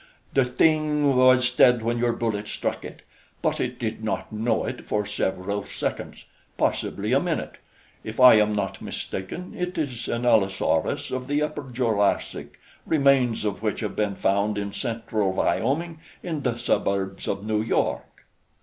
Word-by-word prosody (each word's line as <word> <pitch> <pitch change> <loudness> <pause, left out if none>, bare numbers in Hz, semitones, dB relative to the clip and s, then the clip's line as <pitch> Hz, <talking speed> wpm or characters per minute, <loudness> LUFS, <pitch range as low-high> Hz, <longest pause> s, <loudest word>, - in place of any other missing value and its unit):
The 135 -2 +4
thing 150 +1 +2
was 130 0 +5
dead 125 -2 +5
when 120 +1 0
your 120 0 +2
bullets 105 -3 -2
struck - - -3
it; - - -10 0.4
but - - 0
it - - -2
did - - -4
not - - -3
know 110 +2 0
it - - -6
for 105 -1 0
several 100 -1 -2
seconds - - -5 0.3
possibly - - -1
a - - +5
minute. - - -3 0.5
If 110 +2 -7
I 125 -3 +9
am 105 0 +2
not 100 -2 -3
mistaken, 95 - -6
it 180 0 -3
is 130 -6 -3
an 120 +1 -2
Allosaurus 100 -5 +1
of 130 0 -3
the 145 +1 +1
Upper 145 -3 -4
Jurassic, 115 -5 -1 0.2
remains 135 -7 +2
of 105 -1 -2
which 110 -1 -2
have 105 - -3
been 105 -2 0
found 100 +2 +1
in 100 -1 -3
Central 110 -5 -2
Wyoming, 160 - 0 0.2
in 160 -5 -3
the 125 -3 -1
suburbs 95 -4 -1
of 100 +1 -3
New 110 -1 0
York." 110 - -2
115 Hz, 160 wpm, -25 LUFS, 105-130 Hz, 0.5 s, I